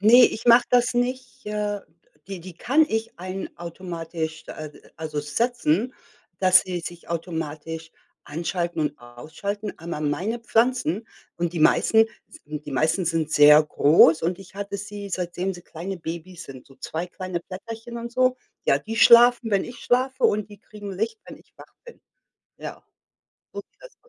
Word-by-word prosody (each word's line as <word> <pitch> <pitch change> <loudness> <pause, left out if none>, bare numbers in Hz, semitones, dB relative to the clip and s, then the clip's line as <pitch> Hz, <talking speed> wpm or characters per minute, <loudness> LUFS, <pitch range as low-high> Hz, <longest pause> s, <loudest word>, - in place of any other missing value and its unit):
Ne, 235 +5 +8
ich 220 - -1
mache 240 +1 +7
das 245 0 +3
nicht, 250 0 -2
äh 210 -1 -2 0.5
d 195 - -4
die 180 - -8
die 180 +1 -10
kann 285 - +3
ich 220 -3 -3
ein 185 +2 -5
automatisch, 165 -2 -5
äh, 155 -1 -7 0.3
also, 155 -2 -4
setzen, 230 - 0 0.5
dass 185 -1 +6
sie 185 -2 -4
sich 175 +1 -9
automatisch 165 -1 -5 0.3
anschalten 170 +2 -3
und 150 0 -1
ausschalten, 160 - -6
aber 165 -1 -5
meine 180 +10 -1
Pflanzen 230 -3 +1 0.3
und 170 0 -1
die 175 - -3
meisten 220 +7 +5 0.2
s - - -14
die 150 0 -7
meisten 155 +7 +1
sind 165 -2 0
sehr 150 0 +8
groß 155 +1 +5
und 175 +2 -1
ich 190 -1 -14
hatte 200 0 -4
sie, 205 0 -7
seitdem 180 0 -2
sie 175 -1 -11
kleine 180 +5 -6
Babys 170 +2 -7
sind, 130 -2 -11
so 135 - -19
zwei 165 +3 -4
kleine 185 -1 -5
Blätterchen 225 +6 -8
und 235 0 -7
so. 255 0 +2 0.3
Ja, - - +3
die 225 - -6
schlafen, 235 0 +7
wenn 200 -2 +2
ich 245 - -9
schlafe 260 +2 0
und 210 0 +2
die 205 -1 -13
kriegen 205 -1 -9
Licht, 440 - -2
wenn - - -10
ich - - -25
wach - - -15
bin. 480 - -13 0.6
Ja, - - -8 0.7
so - - -5
sieht - - -24
das - - -12
aus. - - -26
185 Hz, 170 wpm, -24 LUFS, 165-225 Hz, 0.7 s, Ne